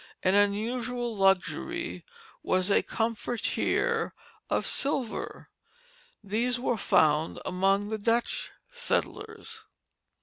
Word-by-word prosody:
An 185 - +3
unusual 230 +4 +1
luxury 195 - +1 0.4
was 185 +2 +1
a - - +5
comfortier 240 - 0 0.4
of - - +1
silver. 275 -4 -2 0.7
These 230 +5 0
were 245 -1 +1
found 155 -5 +3
among 195 +2 +1
the 220 0 -2
Dutch 230 +3 +1 0.2
settlers. 465 -2 -3
225 Hz, 90 wpm, -28 LUFS, 200-250 Hz, 0.7 s, a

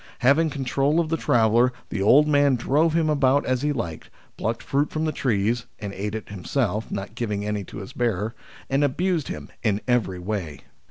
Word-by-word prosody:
Having 145 +6 +4
con 140 -2 -4
trol 140 +5 +2
of 165 -2 0
the 165 - +1
traveller, 120 -3 +3 0.2
the 100 - -3
old 140 +9 +6
man 145 -2 +4
drove 150 +7 +2
him 165 -2 +2
about 140 -2 +3
as 130 -1 0
he 150 +1 +1
liked, 85 - -4 0.3
plucked 115 +1 -3
fruit 145 +2 0
from 155 +1 -2
the 155 - 0
trees, 115 -3 0
and 100 -3 -6
ate 105 +2 -4
it 110 - -6
himself, 105 +2 -2
not 100 +2 -5
giving 105 -4 -3
any 105 -1 -2
to - - -10
his 100 +5 -8
bearer, 110 -2 -1 0.3
and 135 +2 +1
abused 165 +3 0
him - - -6
in 105 -3 +1
every 115 -7 +1
way. 90 -5 -4
125 Hz, 200 wpm, -24 LUFS, 105-145 Hz, 0.3 s, old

